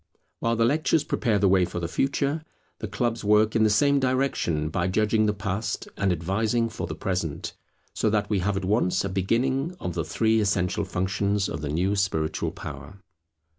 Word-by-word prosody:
While 115 Hz, 0 st, +1 dB
the 115 Hz, 0 st, +3 dB
lectures 155 Hz, +3 st, +2 dB
prepare 115 Hz, -8 st, 0 dB
the 100 Hz, 0 st, +3 dB
way 95 Hz, -1 st, +4 dB
for 90 Hz, -, -3 dB
the 85 Hz, -, -2 dB
Future, 140 Hz, -, 0 dB, 0.4 s
the -, -, -4 dB
clubs 120 Hz, -1 st, -2 dB
work 105 Hz, +1 st, +3 dB
in 110 Hz, -, +4 dB
the 110 Hz, -, +4 dB
same 140 Hz, +7 st, +3 dB
direction 130 Hz, -, 0 dB
by 85 Hz, +3 st, -1 dB
judging 110 Hz, +3 st, +2 dB
the -, -, +3 dB
Past, 100 Hz, +2 st, -3 dB
and 100 Hz, -2 st, +1 dB
advising 110 Hz, +7 st, 0 dB
for 90 Hz, -6 st, -5 dB
the 80 Hz, -, -5 dB
Present; 85 Hz, -2 st, -3 dB, 0.4 s
so 110 Hz, -, +1 dB
that 105 Hz, -1 st, +1 dB
we 105 Hz, -2 st, 0 dB
have 95 Hz, +2 st, 0 dB
at 95 Hz, -, -3 dB
once 100 Hz, -2 st, +1 dB
a -, -, -2 dB
beginning 130 Hz, -, 0 dB
of 90 Hz, -, -4 dB
the 85 Hz, -1 st, -1 dB
three 110 Hz, +7 st, +1 dB
essential 95 Hz, -3 st, 0 dB
functions 100 Hz, +2 st, 0 dB
of 80 Hz, -, -5 dB
the 75 Hz, -, -3 dB
new 90 Hz, +7 st, +1 dB
spiritual 90 Hz, -6 st, 0 dB
power. 70 Hz, +8 st, -9 dB
100 Hz, 190 wpm, -26 LUFS, 90-115 Hz, 0.4 s, way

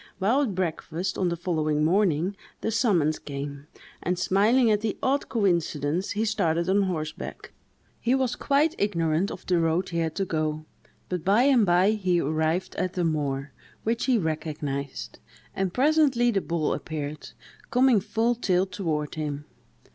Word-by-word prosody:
While 220 Hz, +9 st, +2 dB
at 225 Hz, -10 st, -1 dB
breakfast 180 Hz, 0 st, -2 dB
on 185 Hz, -2 st, 0 dB
the 170 Hz, -, -2 dB
following 155 Hz, -3 st, 0 dB
morning, 180 Hz, +1 st, +2 dB, 0.3 s
the 225 Hz, -, -1 dB
summons 185 Hz, -, +2 dB
came; 140 Hz, 0 st, -6 dB, 0.3 s
and, 180 Hz, +1 st, -1 dB
smiling 215 Hz, +6 st, +3 dB
at 210 Hz, -1 st, +2 dB
the 220 Hz, -2 st, -2 dB
odd 275 Hz, +2 st, +1 dB
coincidence, 170 Hz, -, 0 dB
he 215 Hz, +2 st, 0 dB
started 170 Hz, -6 st, 0 dB
on 195 Hz, +2 st, +3 dB
horseback. 160 Hz, -5 st, -4 dB, 0.5 s
He 245 Hz, +2 st, +2 dB
was 260 Hz, -2 st, 0 dB
quite 295 Hz, +3 st, +2 dB
ignorant 170 Hz, -2 st, +1 dB
of -, -, -8 dB
the 180 Hz, -2 st, +2 dB
road 165 Hz, +2 st, +1 dB
he 170 Hz, -1 st, -2 dB
had 160 Hz, -1 st, -1 dB
to 195 Hz, -, 0 dB
go; 155 Hz, -2 st, -2 dB, 0.4 s
but 180 Hz, -3 st, -3 dB
by 205 Hz, +6 st, +4 dB
and 260 Hz, -7 st, +4 dB
by 180 Hz, +4 st, +4 dB
he 185 Hz, -5 st, +1 dB
arrived 160 Hz, +4 st, 0 dB
at 185 Hz, 0 st, -1 dB
the 180 Hz, -, -1 dB
moor, 145 Hz, -3 st, -1 dB, 0.3 s
which 230 Hz, +1 st, 0 dB
he 255 Hz, -2 st, +3 dB
recognised, 150 Hz, -5 st, -4 dB, 0.4 s
and 190 Hz, -1 st, -1 dB
presently 270 Hz, -, +3 dB
the 195 Hz, -3 st, 0 dB
bull 170 Hz, -3 st, -1 dB
appeared, 150 Hz, -1 st, -5 dB, 0.4 s
coming 250 Hz, -3 st, +4 dB
full 225 Hz, +4 st, 0 dB
tilt 190 Hz, -5 st, 0 dB
toward 155 Hz, -6 st, -2 dB
him. 150 Hz, -2 st, -4 dB
180 Hz, 160 wpm, -26 LUFS, 155-215 Hz, 0.5 s, by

